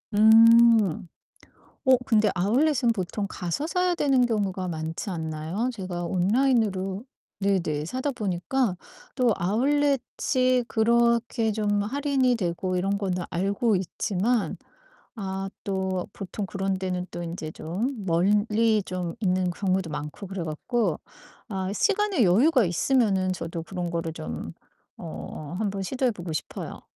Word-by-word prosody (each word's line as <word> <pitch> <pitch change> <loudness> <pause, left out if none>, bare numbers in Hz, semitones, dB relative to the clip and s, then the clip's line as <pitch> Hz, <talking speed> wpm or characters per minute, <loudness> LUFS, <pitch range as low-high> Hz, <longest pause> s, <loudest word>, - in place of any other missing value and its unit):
음. 225 -4 +6 0.8
어, 260 -1 +6
근데 215 -2 +3
아웃렛은 240 - +2
보통 200 +1 -3
가서 180 - -3
사야 360 +1 +1
되는 270 -6 +3
경우가 195 -5 -1
많지 160 +4 -4
않나요? 160 +7 -3
제가 185 -4 -5
온라인으로 195 0 +1 0.3
네네 175 -7 0
사다 260 +7 -2
보니까 205 0 -1 0.4
또 250 -4 +3
아웃렛이 255 +3 +1
그렇게 235 0 +2
좀 205 -1 0
할인이 265 +1 +1
되고 180 -1 -2
이런 195 +2 0
거는 180 -3 -2
알고 200 +4 +1
있지만, 205 +5 -1 0.6
아 195 -1 -4
또 190 -2 -2
보통 195 +1 -5
그런 195 0 -2
데는 180 -1 -3
또 175 - -6
인제 165 -2 -5
좀 210 - -4
멀리 210 +5 +2
좀 180 -2 -4
있는 185 -2 +1
경우도 185 -2 -1
많고 150 +6 -6
그래 190 -1 -5
갖고 170 +4 -1 0.5
아 190 -2 -3
시간의 405 - +2
여유가 245 - +4
있으면은 190 0 +2
저도 165 -2 -5
그런 180 -2 -4
거를 165 -1 -3
좀 80 - -6 0.5
어 80 - -7
한번 200 -2 -2
시도해 255 +5 0
보고 175 -4 -6
싶어요. - - -6
195 Hz, 260 characters per minute, -26 LUFS, 180-235 Hz, 0.8 s, 음